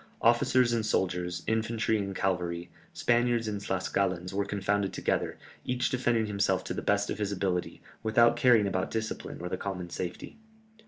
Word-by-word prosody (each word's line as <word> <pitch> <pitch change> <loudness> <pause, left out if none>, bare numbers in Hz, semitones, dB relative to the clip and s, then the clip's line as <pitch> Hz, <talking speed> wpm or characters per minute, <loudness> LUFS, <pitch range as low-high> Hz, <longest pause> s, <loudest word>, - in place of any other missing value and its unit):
Officers 120 +1 +4
and 115 -2 +1
soldiers, 90 -4 -1
infantry 110 0 0
and 100 -1 -3
cavalry, 85 -2 -1 0.2
Spaniards 120 -1 +2
and 105 -2 -3
Tlascalans 95 -1 -1
were 100 +1 0
confounded 100 0 0
together, - - -1 0.3
each 125 0 0
defended 120 -3 +1
himself 100 -2 +1
to - - -4
the - - -3
best 100 0 +1
of - - -4
his 105 -1 -1
ability, 95 -2 -2 0.2
without 115 +2 +4
caring 120 -3 +5
about 95 -2 -1
discipline 110 0 -4
or 90 - -3
the - - -2
common 90 -3 -5
safety. 90 - -6
100 Hz, 160 wpm, -29 LUFS, 95-115 Hz, 0.3 s, caring